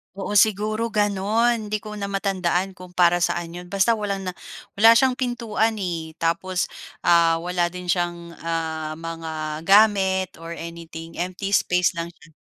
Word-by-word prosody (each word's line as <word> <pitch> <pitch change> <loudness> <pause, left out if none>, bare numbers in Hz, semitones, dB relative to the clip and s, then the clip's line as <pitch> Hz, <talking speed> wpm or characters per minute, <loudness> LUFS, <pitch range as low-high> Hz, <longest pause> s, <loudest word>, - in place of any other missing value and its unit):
Oo, 200 +1 0
siguro 215 +2 +1
gano'n. 210 +3 +1
'Di 210 0 -3
ko 215 - -8
na 200 - -3
matandaan 195 -2 0
kung 180 -1 -13
para 175 -1 +4
saan 175 -1 -1
'yon 175 +1 -8
basta 200 +5 +2
walang 200 -2 -2
na 185 - -3 0.5
wala 225 +2 +8
siyang 255 +1 +3
pintuan 230 -3 0
eh, 170 -5 -4
tapos 175 +2 0 0.3
ah 170 -1 +5
wala 175 0 0
din 180 0 -5
siyang 175 -1 -1
ah 160 -2 -3
mga 160 -1 -5
gamit 195 -2 +4
or 165 0 -7
anything, 165 0 -9
empty 185 +3 -3
space 180 -3 +3
lang 170 +1 -5
siya. 165 0 -19
180 Hz, 155 wpm, -23 LUFS, 170-205 Hz, 0.5 s, wala